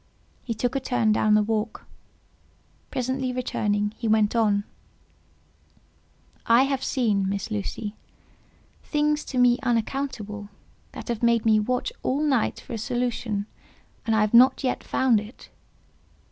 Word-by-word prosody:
He 230 - -4
took 245 +4 -1
a - - +2
turn 245 -4 +1
down 215 0 +3
the 210 - +4
walk; 220 +1 -2 1.0
presently 260 +1 -2
returning, 210 -4 -1
he 230 - -2
went 215 0 +3
on:—"I 225 +2 -3
have 270 -1 -1
seen, 210 -7 +1
Miss 200 +3 -3
Lucy, 210 0 -4 0.9
things 300 0 0
to 260 - -5
me 245 0 +4
unaccountable, 230 -4 -2 0.4
that - - -8
have 235 -2 -2
made 235 -1 +2
me 215 -1 +5
watch 250 +4 -1
all 275 +4 0
night 270 -7 +1
for - - -9
a 225 - -3
solution, 235 -3 -2 0.6
and 225 - +1
I 220 - +3
have 215 +1 +1
not 255 +4 +6
yet 255 - -1
found 250 -5 +2
it." 215 +4 -12
230 Hz, 135 wpm, -25 LUFS, 210-255 Hz, 1.0 s, not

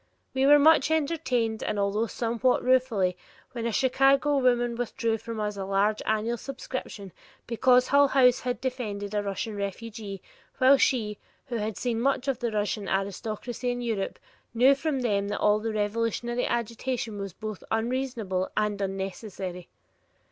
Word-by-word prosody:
We 265 +1 +2
were 295 +1 +8
much 315 +3 +5
entertained, 265 -8 0
although 205 +2 0
somewhat 235 +2 0
ruefully, 245 -8 +2 0.4
when 235 -2 -3
a - - -1
Chicago 270 +4 +3
woman 240 -2 +2
withdrew 230 -1 -1
from 230 0 -6
us 210 -1 -2
a 195 - -3
large 200 +2 +1
annual 220 +2 0
subscription 255 -6 -6 0.3
because 250 +2 +3
Hull 285 0 +6
House 255 -2 +4
had 250 -1 -3
defended 215 -6 -4
a 210 - +1
Russian 205 +2 -4
refugee 200 0 -6 0.3
while 265 +1 +6
she, 210 -5 +1 0.3
who 240 - -2
had 215 -1 -3
seen 235 -2 -1
much 275 +1 +1
of 270 -3 0
the 240 - -1
Russian 210 -1 -2
aristocracy 215 +5 -3
in 245 0 -2
Europe, 220 -5 -2 0.4
knew 255 +4 +6
from 275 -1 -2
them 200 -4 0
that 205 - -2
all 210 0 +3
the 225 +1 -3
revolutionary 230 +3 -1
agitation 235 -1 -2
was 195 -3 -5
both 215 0 -7
unreasonable 225 -5 -1
and 210 -1 0
unnecessary! 190 -2 -5
230 Hz, 150 wpm, -27 LUFS, 205-255 Hz, 0.4 s, were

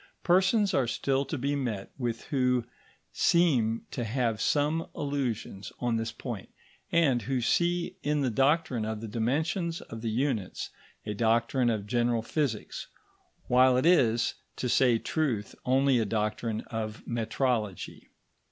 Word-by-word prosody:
Persons 190 +3 +3
are 130 - +2
still 135 +3 0
to 160 - -4
be 140 +3 -1
met 115 -8 -3
with 120 -3 -3
who 125 -3 +1 0.5
seem 130 -11 +2
to 125 - -3
have 115 -1 -1
some 150 +3 +1
illusions 130 -8 -3
on 120 -2 0
this 115 0 -2
point, 120 -7 -7 0.4
and 145 -8 +3
who 130 +4 -1
see 175 +8 +1
in 150 0 0
the 130 -3 +1
doctrine 135 -1 +2
of 110 0 -3
the 115 - -6
dimensions 155 - -1
of 115 0 -9
the 115 - -2
units 115 -4 -2 0.3
a 105 - -2
doctrine 115 +3 +2
of 110 -3 -1
general 120 0 +1
physics, 130 -4 -2 0.6
while 125 +1 +5
it 130 - +1
is, 120 -10 +4 0.2
to 125 - -2
say 125 -1 +4
truth, 120 -7 -1
only 130 0 +3
a 110 - +1
doctrine 110 +1 -1
of 110 -1 -5
metrology. 115 -3 -2
125 Hz, 145 wpm, -29 LUFS, 115-145 Hz, 0.6 s, while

